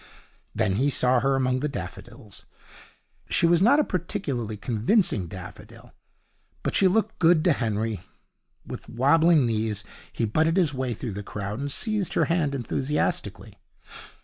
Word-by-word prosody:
Then 95 Hz, 0 st, +1 dB
he 135 Hz, +5 st, +2 dB
saw 125 Hz, -1 st, +2 dB
her, 135 Hz, +2 st, +1 dB
among 130 Hz, -1 st, +1 dB
the 150 Hz, +3 st, -2 dB
daffodils. 120 Hz, -5 st, -9 dB, 0.8 s
She -, -, +2 dB
was 170 Hz, 0 st, +4 dB
not 275 Hz, +9 st, +5 dB
a -, -, +4 dB
particularly 145 Hz, -, -3 dB
convincing 115 Hz, -, +1 dB
daffodil, 90 Hz, +1 st, -11 dB, 0.7 s
but -, -, -2 dB
she 195 Hz, -, +5 dB
looked 220 Hz, +3 st, 0 dB
good 165 Hz, -2 st, +4 dB
to 175 Hz, -3 st, +4 dB
Henry. 110 Hz, -3 st, -2 dB, 0.7 s
With -, -, -8 dB
wabbling 150 Hz, +4 st, +4 dB
knees 110 Hz, -2 st, -1 dB, 0.3 s
he 115 Hz, -, -1 dB
butted 160 Hz, -, +1 dB
his 165 Hz, -6 st, +2 dB
way 130 Hz, -3 st, -2 dB
through 115 Hz, -1 st, -5 dB
the 100 Hz, -, -5 dB
crowd 105 Hz, +1 st, -5 dB
and 140 Hz, 0 st, -3 dB
seized 210 Hz, -, -2 dB
her -, -, +3 dB
hand 165 Hz, -5 st, 0 dB
enthusiastically. 135 Hz, +3 st, -2 dB
135 Hz, 150 wpm, -25 LUFS, 110-170 Hz, 0.8 s, not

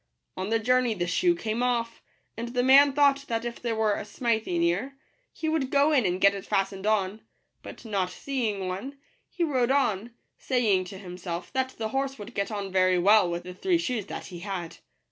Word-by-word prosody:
On 190 Hz, +2 st, -4 dB
the 225 Hz, -, +3 dB
journey 245 Hz, 0 st, +2 dB
the 175 Hz, -3 st, -1 dB
shoe 345 Hz, -, +2 dB
came 225 Hz, -7 st, -3 dB
off; 235 Hz, -2 st, -1 dB, 0.3 s
and 230 Hz, +2 st, -4 dB
the 245 Hz, -, +2 dB
man 275 Hz, +2 st, +7 dB
thought 280 Hz, -1 st, +3 dB
that 230 Hz, 0 st, -2 dB
if 240 Hz, 0 st, -5 dB
there 235 Hz, -2 st, -1 dB
were 220 Hz, -1 st, +2 dB
a -, -, -3 dB
smithy 220 Hz, -4 st, -1 dB
near, 190 Hz, +12 st, 0 dB, 0.3 s
he 320 Hz, -, -5 dB
would 315 Hz, -4 st, 0 dB
go 285 Hz, +2 st, +3 dB
in 255 Hz, -9 st, +3 dB
and 180 Hz, +1 st, -1 dB
get 200 Hz, +1 st, +5 dB
it 195 Hz, -1 st, -6 dB
fastened 195 Hz, +1 st, -1 dB
on; 210 Hz, 0 st, 0 dB, 0.4 s
but -, -, -11 dB
not 195 Hz, -4 st, -1 dB
seeing 215 Hz, -3 st, -3 dB
one, 215 Hz, +10 st, -5 dB, 0.3 s
he 350 Hz, -, -2 dB
rode 260 Hz, -6 st, +1 dB
on, 235 Hz, -5 st, 0 dB, 0.2 s
saying 215 Hz, -8 st, +1 dB
to 190 Hz, +1 st, -9 dB
himself, 180 Hz, -1 st, -7 dB
that 260 Hz, -1 st, -1 dB
the 220 Hz, -1 st, -3 dB
horse 270 Hz, +1 st, -2 dB
would 205 Hz, -, -9 dB
get 200 Hz, -, -2 dB
on 200 Hz, -3 st, -4 dB
very 185 Hz, -1 st, +3 dB
well 200 Hz, +1 st, +5 dB
with 170 Hz, 0 st, -3 dB
the 180 Hz, 0 st, -8 dB
three 355 Hz, -, +1 dB
shoes 250 Hz, -, -2 dB
that -, -, -6 dB
he 175 Hz, -2 st, -9 dB
had. 180 Hz, -3 st, -5 dB
220 Hz, 205 wpm, -27 LUFS, 190-260 Hz, 0.4 s, man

